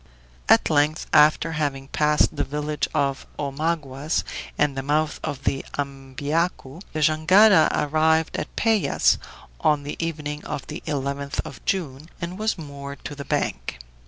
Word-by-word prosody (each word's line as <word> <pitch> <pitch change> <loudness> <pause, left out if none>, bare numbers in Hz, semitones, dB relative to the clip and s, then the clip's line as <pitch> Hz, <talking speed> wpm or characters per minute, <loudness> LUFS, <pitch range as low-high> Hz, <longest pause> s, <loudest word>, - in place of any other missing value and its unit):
At - - +5
length, 150 +1 +2
after 155 +2 +5
having 145 -3 -2
passed 150 0 +2
the - - 0
village 150 +1 -2
of 140 -1 -1
Omaguas 145 0 -1 0.3
and 145 -2 +2
the 135 - -2
mouth 150 +3 0
of 140 -1 -4
the 135 - 0
Ambiacu, 140 +3 -2
the 155 - -3
jangada 160 +5 +6
arrived 160 +2 +2
at - - -5
Pevas 220 -3 +3 0.4
on 150 -2 +2
the 145 +3 -4
evening 150 -2 -4
of 135 - -5
the 155 +3 -7
11th 140 -1 -3
of 140 - -10
June, 155 -5 -2
and 180 +2 -5
was 220 -1 0
moored 140 -3 -8
to - - -4
the 140 -1 -7
bank. - - -2
150 Hz, 145 wpm, -24 LUFS, 140-160 Hz, 0.4 s, jangada